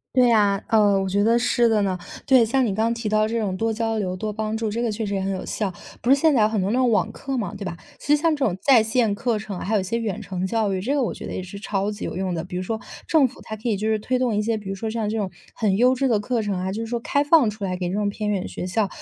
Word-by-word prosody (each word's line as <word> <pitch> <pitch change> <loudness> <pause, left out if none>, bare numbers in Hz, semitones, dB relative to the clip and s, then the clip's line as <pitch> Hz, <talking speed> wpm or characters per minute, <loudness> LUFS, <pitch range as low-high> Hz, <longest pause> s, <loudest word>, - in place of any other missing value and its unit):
对 250 -2 +5
呀， 205 -3 +3
呃， 205 -3 +4
我 195 - -1
觉 200 +2 +1
得 230 +2 +4
是 240 0 +2
的 215 -2 +3
呢， 190 -2 0 0.3
对， 260 -4 +6
像 255 +3 +2
你 210 - 0
刚 220 +3 +1
刚 230 - +1
提 230 -2 -4
到 215 0 +2
这 230 +1 -2
种 200 -4 -1
多 225 +4 0
交 225 0 -1
流、 185 -3 -2
多 210 +3 -4
帮 215 +1 -2
助， 220 -1 -2
这 230 +3 -2
个 235 - 0
确 215 +1 -3
实 200 - -3
也 195 - -1
很 195 +1 -1
有 190 - -4
效。 205 -3 -2 0.3
不 240 - -1
是 270 - +8
现 310 +2 +3
在 245 - +3
有 210 - +4
很 220 -1 -1
多 190 +2 0
那 250 - +1
种 255 -1 +3
网 215 -1 +1
课 270 +3 -4
吗， 220 - -3
对 - - -6
吧？ 175 -3 -5 0.2
其 295 - +3
实 - - -2
像 325 0 +2
这 285 - -2
种 190 -7 +1
在 255 -2 +5
线 220 -1 +1
课 225 +2 -1
程， 205 -3 -6
还 215 +4 -1
有 200 - +2
些 230 +5 -2
远 215 -5 -3
程 185 -1 -3
教 215 -1 0
育， 185 - -2
这 270 +8 0
个 280 - +2
我 230 - -1
觉 - - -8
得 - - -5
也 185 - -4
是 195 +2 -9
超 200 0 -1
级 205 - -6
有 - - -4
用 185 0 -2
的， 165 -1 -3
比 180 - -8
如 180 - -2
说， 220 +4 -3 0.3
政 305 -5 +4
府 - - -14
它 220 - -6
可 220 +3 -4
以 210 - +1
就 215 +3 -2
是 220 -1 +1
推 255 +4 -1
动 250 -4 0
一 210 - +1
些， 225 +1 0
比 205 -2 -8
如 195 - -3
说 220 +3 -4
像 220 -1 -2
这 215 - -2
种 200 -3 -1 0.2
很 200 -4 +1
优 250 +3 +5
质 270 +1 0
的 225 -4 +2
课 230 +3 -1
程 205 -2 -2
啊， 185 +1 -2
就 220 +4 -3
是 225 - -4
说 240 +1 -2
开 285 +4 +1
放 290 -4 +5
出 210 0 -9
来 185 -2 -2
给 180 -1 -2
这 185 - -3
种 205 0 0
偏 210 +1 -3
远 190 -3 -2
学 - - -5
校。 200 +3 0
215 Hz, 365 characters per minute, -23 LUFS, 200-235 Hz, 0.3 s, 是